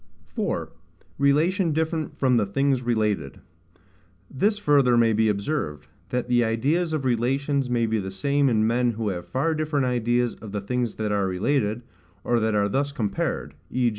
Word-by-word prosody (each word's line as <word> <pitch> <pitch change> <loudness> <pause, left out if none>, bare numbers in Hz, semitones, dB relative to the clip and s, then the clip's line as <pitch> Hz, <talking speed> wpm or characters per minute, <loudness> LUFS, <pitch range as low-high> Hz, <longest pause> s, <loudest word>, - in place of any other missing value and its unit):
4. - - -3 0.5
Relation 160 +5 +2
different 160 0 -2
from 130 -3 +3
the 105 - +2
Things 135 +5 +1
related. 110 - -1 0.9
This 205 +10 +1
further 140 -9 +3
may 115 -1 +4
be 110 +1 +2
observed, 100 - -2 0.2
That 125 +2 -2
the 120 -1 +3
ideas 140 +10 0
of 155 -4 -2
relations 135 +3 0
may 120 -1 +1
be 110 0 0
the 95 -1 -4
same 140 +9 +1
in 110 -2 +2
men 120 +1 +1
who 110 -1 -2
have 90 -2 -5
far 140 +5 0
different 155 -3 0
ideas 120 -1 +1
of 105 -2 -11
the 105 - -2
things 120 +2 -2
that 110 -1 -2
are 100 -2 +1
related, 105 +4 0 0.4
or 120 -1 +1
that 110 -1 0
are 100 -1 +2
thus 140 +7 -1
compared: 110 -8 -2 0.2
v. 125 -1 +1
120 Hz, 170 wpm, -24 LUFS, 110-140 Hz, 0.9 s, may